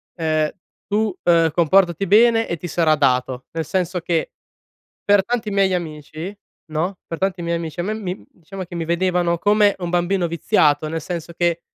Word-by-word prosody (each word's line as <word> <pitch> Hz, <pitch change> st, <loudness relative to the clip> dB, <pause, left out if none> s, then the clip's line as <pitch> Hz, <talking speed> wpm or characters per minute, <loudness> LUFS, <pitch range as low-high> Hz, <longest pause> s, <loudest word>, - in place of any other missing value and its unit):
ehm: 155 Hz, -2 st, 0 dB, 0.4 s
"Tu, 210 Hz, -2 st, 0 dB
ehm, 165 Hz, -2 st, +4 dB
comportati 175 Hz, +3 st, +3 dB
bene 225 Hz, +4 st, +4 dB
e 170 Hz, -, -3 dB
ti 175 Hz, -, -6 dB
sarà 165 Hz, -1 st, +2 dB
dato." 130 Hz, -3 st, 0 dB
Nel 165 Hz, -1 st, -2 dB
senso 180 Hz, +1 st, -1 dB
che 165 Hz, -1 st, -1 dB, 0.7 s
per 205 Hz, -1 st, +4 dB
tanti 235 Hz, -2 st, -2 dB
miei 195 Hz, -1 st, +2 dB
amici, 160 Hz, +2 st, -5 dB, 0.3 s
no, 165 Hz, +5 st, -2 dB
per 165 Hz, -, -5 dB
tanti 190 Hz, -1 st, -1 dB
miei 170 Hz, 0 st, -1 dB
amici 165 Hz, 0 st, -6 dB
a -, -, 0 dB
me 210 Hz, +4 st, -2 dB
mi 190 Hz, -4 st, -5 dB
diciamo 190 Hz, +3 st, -9 dB
che 175 Hz, 0 st, -10 dB
mi 165 Hz, -1 st, -3 dB
vedevano 175 Hz, 0 st, +1 dB
come 205 Hz, +1 st, +4 dB
un 175 Hz, -1 st, -3 dB
bambino 175 Hz, +1 st, +1 dB
viziato, 155 Hz, -2 st, +2 dB
nel 160 Hz, +1 st, -3 dB
senso 170 Hz, 0 st, -6 dB
che 170 Hz, 0 st, 0 dB
175 Hz, 180 wpm, -21 LUFS, 160-195 Hz, 0.7 s, ehm